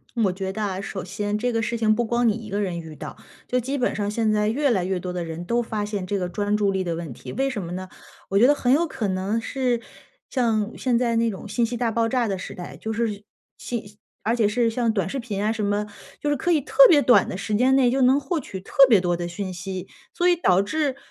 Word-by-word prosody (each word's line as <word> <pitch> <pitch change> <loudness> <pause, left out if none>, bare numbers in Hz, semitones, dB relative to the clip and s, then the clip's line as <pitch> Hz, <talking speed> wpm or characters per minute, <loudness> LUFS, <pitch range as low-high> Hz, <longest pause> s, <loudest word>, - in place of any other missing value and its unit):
我 210 -5 +2
觉 190 0 -4
得 215 - -5
啊， 195 -2 -2
首 190 -2 -5
先 205 +2 -2
这 245 +2 -1
个 225 - +1
事 235 +1 -2
情 215 -1 +3
不 240 - +1
光 235 +1 +1
你 215 - +4
一 220 -1 -8
个 200 +1 -2
人 185 -4 -2
遇 160 -1 -10
到， - - -7 0.3
就 250 - 0
基 270 +4 -2
本 250 - 0
上 205 -1 -1
现 220 0 +1
在 210 0 +2
越 280 +4 +1
来 190 -7 +1
越 185 0 -1
多 180 0 -5
的 175 -1 -3
人 165 +1 -6
都 235 +5 +1
发 215 -3 -3
现 205 -3 -3
这 200 +2 -1
个 180 - -1
专 205 +3 -1
注 205 -1 +2
力 190 -1 -1
的 170 -2 -2
问 165 -6 -6
题， 125 - -9
为 270 0 0
什 210 -7 -4
么 170 - -6
呢？ 185 +1 -5 0.4
我 195 - +1
觉 235 - +6
得 290 - +6
很 255 -2 +2
有 335 +4 +3
可 235 -9 -3
能 190 +4 -1
是 245 0 -1 0.5
像 225 -4 0
现 245 -2 +1
在 235 -2 +1
那 230 -1 +2
种 195 - -8
信 230 +3 +1
息 240 +1 -4
大 240 -1 0
爆 230 0 +1
炸 245 -2 +1
的 195 -2 -1
时 - - -7
代， 180 - -8
就 220 - -5
是 215 -2 -2 0.3
信 210 -4 -6 0.3
而 230 +2 +1
且 225 -3 +2
是 230 +1 +2
像 230 0 0
短 195 -5 -1
视 275 - -4
频 215 -5 -4
啊 215 - +1
什 220 -2 -3
么， 205 +1 0 0.3
就 295 - -1
是 290 - +2
可 345 +6 0
以 315 - +4
特 285 - -11
别 300 -5 +6
短 245 - +5
的 185 - -4
时 205 +1 -2
间 255 +4 +3
内 255 -2 +4
就 265 +2 +1
能 260 +3 +5
获 305 +5 -2
取 195 -9 -6
特 185 - -15 0.2
别 215 -6 +6
多 175 -1 0
的 175 0 -4
讯 185 +1 -5
息， 185 0 -6 0.3
所 355 0 +1
以 350 - +5
导 185 - +3
致 280 +5 -1
215 Hz, 295 characters per minute, -24 LUFS, 195-245 Hz, 0.5 s, 觉